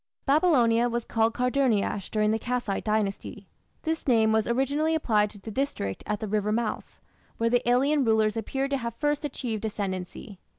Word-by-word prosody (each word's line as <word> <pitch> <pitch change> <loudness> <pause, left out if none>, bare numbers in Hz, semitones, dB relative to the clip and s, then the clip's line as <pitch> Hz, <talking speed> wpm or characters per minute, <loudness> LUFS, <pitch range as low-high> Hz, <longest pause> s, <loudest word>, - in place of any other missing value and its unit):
Babylonia 250 -6 +3
was 235 0 -2
called 225 0 +1
Karduniash 250 -6 0
during 215 -1 +1
the 220 - 0
Kassite 245 -5 -2
Dynasty. 210 -2 -2 0.4
This 320 -1 -3
name 225 -3 +4
was 220 -1 +2
originally 280 +6 +1
applied 215 -9 +2
to 205 - -13
the 220 +3 -8
district 210 - -3
at 210 -1 -1
the 215 - -4
river 210 0 0
mouths, 220 -1 -3 0.4
where 230 0 +1
the 245 0 +2
alien 275 +4 +3
rulers 220 -2 +2
appear 265 +5 -2
to 275 0 -1
have 235 -2 -5
first 295 +3 -1
achieved 235 -7 -4
ascendancy. 195 -2 -5
230 Hz, 170 wpm, -27 LUFS, 215-270 Hz, 0.4 s, name